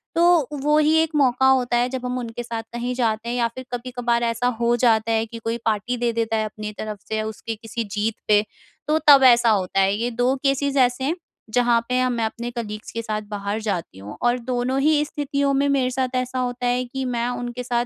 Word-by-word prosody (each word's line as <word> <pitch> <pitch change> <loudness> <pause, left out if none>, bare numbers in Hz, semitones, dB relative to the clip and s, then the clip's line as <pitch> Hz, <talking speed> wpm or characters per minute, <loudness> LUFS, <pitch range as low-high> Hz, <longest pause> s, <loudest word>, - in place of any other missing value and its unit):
तो 340 -4 +4
वो 300 +1 +3
ही 305 +1 +3
एक 320 -1 +2
मौका 265 -2 +3
होता 250 -2 +2
है 245 +1 +1
जब 255 -1 -5
हम 250 0 -2
उनके 240 0 -5
साथ 230 -1 -5
कहीं 245 +1 -2
जाते 230 -1 -1
हैं 245 - -2
या 235 -1 +2
फिर 260 0 -7
कभी-कभार 240 -1 -1
ऐसा 230 +1 0
हो 235 +1 +3
जाता 225 -2 +3
है 225 0 +1
कि 230 +1 -9
कोई 230 +1 -2
पार्टी 225 +3 0
दे 240 0 0
देता 225 -1 -1
है 215 - 0
अपनी 215 0 -6
तरफ़ 215 -2 -5
से, 220 0 -1
उसकी 220 +1 -5
किसी 225 +1 -5
जीत 210 +1 -1
पे। 210 -1 +5 0.5
तो 305 - +3
तब 275 -2 +9
ऐसा 235 -2 +6
होता 195 -2 +1
है। 195 +1 +3
ये 235 +3 -1
2 245 +3 +1
केसेस 275 0 +1
ऐसे 250 0 +2
हैं 315 +6 0 0.4
जहाँ 240 -1 +3
पे 250 0 +1
हाँ 255 0 +2
मैं 235 -2 -1
अपने 235 +2 -4
कलीग्स 215 -3 -6
के 230 - -3
साथ 215 -1 -3
बाहर 205 +1 -3
जाती 185 - -3
हूँ। 105 +2 -9
और 240 +1 +2
दोनों 250 +2 -1
ही 300 0 +3
स्थितियों 280 -2 -1
में 280 +1 +2
मेरे 260 -2 +1
साथ 255 0 -2
ऐसा 255 0 -1
होता 245 0 -2
है 250 +1 +1
कि 265 +2 -4
मैं 235 0 0
उनके 245 0 -4
साथ 240 0 0
240 Hz, 230 wpm, -22 LUFS, 225-255 Hz, 0.5 s, तब